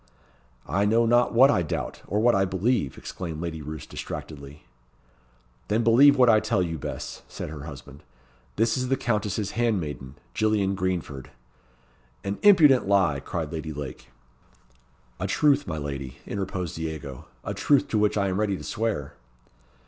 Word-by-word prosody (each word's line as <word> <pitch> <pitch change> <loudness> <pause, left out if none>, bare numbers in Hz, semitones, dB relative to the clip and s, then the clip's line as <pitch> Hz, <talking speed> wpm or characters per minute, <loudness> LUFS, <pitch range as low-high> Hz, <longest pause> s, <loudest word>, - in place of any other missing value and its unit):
"I 95 +8 0
know 115 +3 +3
not 120 +1 +3
what 130 +4 +6
I 90 - +2
doubt, 80 - -4
or 105 - 0
what 120 +2 +4
I 95 - +3
believe," 95 - 0
exclaimed 85 -4 -6
Lady 80 -2 -4
Roos 75 +1 -7
distractedly. 75 -1 -8 1.0
"Then 110 +2 +1
believe 135 +6 +6
what 125 -1 +6
I 110 -2 +6
tell 95 - 0
you, 80 -3 -4
Bess," - - -6
said - - -7
her 75 -2 -8
husband. 70 -1 -10 0.5
"This 115 +1 +2
is 130 0 -1
the 135 +1 +1
countess's 105 -3 -1
handmaiden, 80 - -2 0.2
Gillian 105 -3 +1
Greenford." 90 -8 -3 0.9
"An 100 +1 -3
impudent 155 - +6
lie!" 95 -8 +3
cried 80 +1 -4
Lady 80 -1 -4
Lake. 70 -4 -8 1.1
"A - - -2
truth, 145 -1 +2
my 80 - -3
lady," 70 -3 -5
interposed 95 -4 -4
Diego. 80 -5 -6 0.2
"A - - -3
truth 145 -2 +2
to 110 - +1
which 105 0 +2
I 100 -1 +1
am 95 +1 -1
ready 100 -3 0
to - - -9
swear." 110 - -2
95 Hz, 155 wpm, -26 LUFS, 75-115 Hz, 1.1 s, what